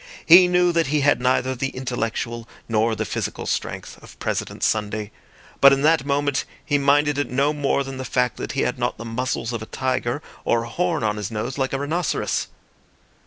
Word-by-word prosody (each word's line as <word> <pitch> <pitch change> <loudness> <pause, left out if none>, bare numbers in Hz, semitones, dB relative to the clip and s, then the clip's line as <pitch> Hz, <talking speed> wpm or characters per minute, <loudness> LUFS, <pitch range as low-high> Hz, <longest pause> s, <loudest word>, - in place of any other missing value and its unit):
He 180 +2 +9
knew 180 0 +3
that 165 -3 +1
he 150 +1 +1
had 145 -2 +3
neither 130 +1 +1
the 130 +1 -2
intellectual 120 -2 -4 0.2
nor 110 0 +1
the - - -2
physical - - -4
strength - - -4
of - - -15
President - - -3
Sunday; 105 -1 -1 0.5
but 140 - +8
in 135 0 +2
that 155 -2 +3
moment 145 -1 +1 0.2
he 145 -2 +1
minded 145 +1 +3
it 145 - -1
no 140 +4 +1
more 140 -1 0
than 135 -1 -7
the 130 - -4
fact 125 -2 0
that - - -5
he - - 0
had - - -1
not - - -1
the 115 - -8
muscles 115 0 -2
of 115 - -3
a 110 - -7
tiger 130 +2 -2 0.2
or 115 -1 +1
a 115 - -8
horn 170 0 -1
on 105 -1 0
his 105 -2 -4
nose 115 +5 -4
like 130 0 0
a 135 - -1
rhinoceros. 155 +5 -1
130 Hz, 205 wpm, -22 LUFS, 115-145 Hz, 0.5 s, He